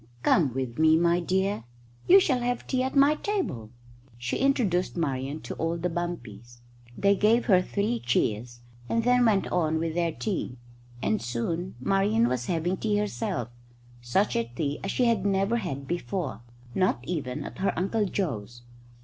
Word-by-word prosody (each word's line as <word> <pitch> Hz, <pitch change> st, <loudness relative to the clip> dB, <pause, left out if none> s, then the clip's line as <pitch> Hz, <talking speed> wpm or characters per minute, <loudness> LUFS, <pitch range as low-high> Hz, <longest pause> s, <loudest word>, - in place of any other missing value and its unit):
"Come 140 Hz, -5 st, +3 dB
with 130 Hz, -2 st, -3 dB
me, 160 Hz, 0 st, +6 dB
my 170 Hz, +1 st, +3 dB
dear. 190 Hz, -, 0 dB, 0.4 s
You 380 Hz, +2 st, +9 dB
shall 265 Hz, -9 st, +2 dB
have 245 Hz, 0 st, -2 dB
tea 255 Hz, -, 0 dB
at 260 Hz, +2 st, -2 dB
my 280 Hz, +2 st, +6 dB
table." 305 Hz, -, -3 dB, 0.5 s
She 120 Hz, 0 st, -2 dB
introduced 215 Hz, -11 st, +1 dB
Marian 140 Hz, -1 st, -2 dB
to -, -, -6 dB
all 165 Hz, +1 st, -1 dB
the 175 Hz, +1 st, -2 dB
bumpies. 120 Hz, -9 st, -6 dB, 0.4 s
They 200 Hz, 0 st, +4 dB
gave 220 Hz, +4 st, +3 dB
her 185 Hz, -5 st, +5 dB
three 210 Hz, +5 st, -1 dB
cheers, 120 Hz, 0 st, -1 dB, 0.3 s
and 230 Hz, 0 st, +1 dB
then 250 Hz, +1 st, +4 dB
went 205 Hz, -4 st, +3 dB
on 160 Hz, -3 st, +1 dB
with 160 Hz, 0 st, -2 dB
their 170 Hz, 0 st, 0 dB
tea, 165 Hz, -, -3 dB, 0.5 s
and 105 Hz, +1 st, +1 dB
soon 130 Hz, +11 st, -3 dB
Marian 200 Hz, -, +2 dB
was 125 Hz, -1 st, -2 dB
having 175 Hz, +2 st, 0 dB
tea 210 Hz, 0 st, 0 dB
herself 210 Hz, -, -2 dB, 0.5 s
such 125 Hz, +13 st, +1 dB
a 115 Hz, -, +1 dB
tea 140 Hz, +5 st, -3 dB
as 195 Hz, -, -2 dB
she 250 Hz, -, +1 dB
had 230 Hz, -5 st, +2 dB
never 200 Hz, +3 st, +1 dB
had 140 Hz, -, -4 dB
before, 175 Hz, -3 st, -3 dB, 0.3 s
not 185 Hz, -9 st, +1 dB
even 145 Hz, -8 st, -3 dB
at -, -, -9 dB
her 195 Hz, -, 0 dB
Uncle 205 Hz, +4 st, +1 dB
Joe's. 120 Hz, -, -4 dB
175 Hz, 165 wpm, -27 LUFS, 135-210 Hz, 0.5 s, You